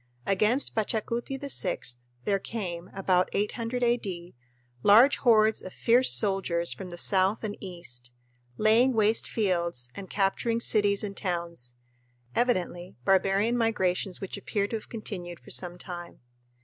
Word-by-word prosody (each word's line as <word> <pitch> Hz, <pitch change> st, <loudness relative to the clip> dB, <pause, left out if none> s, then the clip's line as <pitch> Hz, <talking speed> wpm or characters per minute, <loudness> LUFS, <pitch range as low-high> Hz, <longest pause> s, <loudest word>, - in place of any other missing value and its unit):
Against 215 Hz, +7 st, +1 dB
Pachacuti 230 Hz, +4 st, -2 dB
VI 180 Hz, -, -2 dB, 0.3 s
there 200 Hz, -1 st, +1 dB
came 180 Hz, -5 st, -5 dB
(about 185 Hz, -1 st, +1 dB
800 230 Hz, +4 st, -2 dB
A.D.) 195 Hz, -8 st, -1 dB, 0.5 s
large 230 Hz, -, +6 dB
hordes 220 Hz, -3 st, +4 dB
of 185 Hz, -, -9 dB
fierce 245 Hz, +2 st, +4 dB
soldiers 190 Hz, -5 st, +1 dB
from 190 Hz, -2 st, -8 dB
the 175 Hz, -, -8 dB
south 190 Hz, +4 st, +2 dB
and 210 Hz, -2 st, -3 dB
east, 145 Hz, -10 st, -7 dB, 0.5 s
laying 230 Hz, +4 st, +4 dB
waste 220 Hz, 0 st, +2 dB
fields 170 Hz, -, -1 dB
and 195 Hz, -2 st, -9 dB
capturing 215 Hz, +4 st, 0 dB
cities 205 Hz, -3 st, +3 dB
and 200 Hz, -1 st, -4 dB
towns; 170 Hz, -, -3 dB, 0.6 s
evidently 180 Hz, -, -1 dB
barbarian 195 Hz, +4 st, +3 dB
migrations 190 Hz, -5 st, 0 dB
which 195 Hz, +1 st, -5 dB
appear 200 Hz, 0 st, -1 dB
to -, -, -3 dB
have 220 Hz, -, -7 dB
continued 180 Hz, -6 st, -6 dB
for -, -, -14 dB
some 175 Hz, -1 st, 0 dB
time. 175 Hz, -1 st, -8 dB
195 Hz, 135 wpm, -28 LUFS, 180-225 Hz, 0.6 s, large